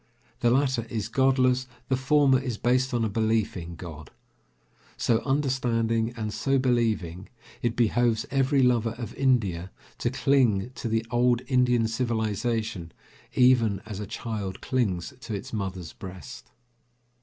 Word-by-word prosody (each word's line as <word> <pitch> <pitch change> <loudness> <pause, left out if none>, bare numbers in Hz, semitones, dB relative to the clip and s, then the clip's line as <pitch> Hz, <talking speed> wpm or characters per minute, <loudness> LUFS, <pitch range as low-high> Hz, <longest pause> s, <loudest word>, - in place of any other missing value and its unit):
The 120 - +3
latter 130 -2 +1
is 110 -4 -3
godless, 130 -1 +2 0.2
the 130 - +2
former 135 0 +4
is 125 -4 -4
based 130 +3 +1
on 120 -3 +1
a - - +1
belief 110 0 0
in 85 -1 -6
God. 80 -3 -9 0.9
So 115 -2 +2
understanding 120 -5 +1
and 110 -2 -3
so 135 +4 +1
believing, 115 -9 0 0.3
it 120 0 0
behoves 120 -1 +2
every 135 0 +3
lover 115 -2 +2
of 120 -4 -6
India 100 -10 +1 0.3
to - - 0
cling 125 -6 +2
to 125 - -5
the 115 0 0
old 120 0 +2
Indian 125 -3 +3
civilization 110 -5 -2 0.4
even 120 -6 +4
as 105 -3 -6
a 105 - -5
child 105 -3 -5
clings 110 -4 -1
to 115 -3 -5
its 115 +6 -7
mother's 95 -5 -4
breast. 95 -1 -10
115 Hz, 140 wpm, -26 LUFS, 105-130 Hz, 0.9 s, former